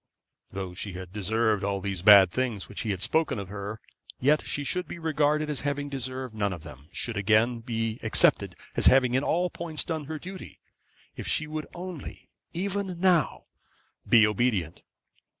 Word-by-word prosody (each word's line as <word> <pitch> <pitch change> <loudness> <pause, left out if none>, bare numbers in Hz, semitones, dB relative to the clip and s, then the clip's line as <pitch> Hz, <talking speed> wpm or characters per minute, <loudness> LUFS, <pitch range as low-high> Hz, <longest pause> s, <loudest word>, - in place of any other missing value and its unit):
Though 95 -2 -5
she 95 +2 -6
had 90 0 -8
deserved 105 +1 +1
all 100 0 -1
these 95 -2 -3
bad 100 -2 +8
things 120 -4 -2
which 105 - -6
he 110 - -3
had 95 -2 -1
spoken 160 -6 +1
of 100 -2 -6
her, 100 +2 -6 0.4
yet 150 +4 +3
she 145 - -2
should 180 +5 -1
be - - -7
regarded 155 -2 +1
as 150 -2 -3
having 145 0 -2
deserved 130 -2 -5
none 100 -2 -1
of 85 - -9
them, 70 +4 -12
should 115 - -3
again 110 +4 +2
be 115 -1 -3
accepted 110 - +3 0.2
as - - +3
having 130 -2 +5
in 130 +2 +2
all 175 +3 +1
points 165 -3 -4
done 160 -3 -3
her 155 +2 -5
duty, 185 +4 -9 0.6
if - - -7
she 155 - 0
would 155 0 -5
only, 175 -3 -8 0.2
even 190 0 -3
now, 180 -3 +2 0.7
be 115 -2 +7
obedient. 105 -6 0
120 Hz, 175 wpm, -27 LUFS, 100-155 Hz, 0.7 s, bad